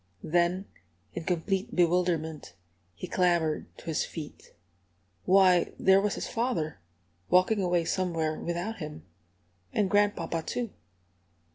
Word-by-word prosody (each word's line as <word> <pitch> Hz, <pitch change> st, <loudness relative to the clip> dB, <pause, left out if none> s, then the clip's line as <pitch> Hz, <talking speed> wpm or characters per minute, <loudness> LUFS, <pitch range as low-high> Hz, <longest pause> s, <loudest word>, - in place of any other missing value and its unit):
Then, 175 Hz, +3 st, +1 dB, 0.5 s
in 170 Hz, -, -5 dB
complete 190 Hz, +5 st, -1 dB
bewilderment, 165 Hz, -, +1 dB, 0.4 s
he -, -, -6 dB
clambered 170 Hz, -4 st, +1 dB
to -, -, -14 dB
his 160 Hz, -2 st, 0 dB
feet. 155 Hz, -3 st, -9 dB, 0.7 s
Why, 185 Hz, -2 st, +5 dB
there 190 Hz, +1 st, +5 dB
was 205 Hz, 0 st, 0 dB
his -, -, -4 dB
father, 185 Hz, -, -2 dB, 0.5 s
walking 185 Hz, +3 st, +4 dB
away 175 Hz, -2 st, +1 dB
somewhere 165 Hz, -4 st, -1 dB
without 175 Hz, +6 st, -3 dB
him! 150 Hz, -, -7 dB, 0.7 s
And 200 Hz, -3 st, 0 dB
grandpapa, 205 Hz, -5 st, +1 dB
too! 235 Hz, +6 st, -3 dB
175 Hz, 115 wpm, -29 LUFS, 160-195 Hz, 0.7 s, Why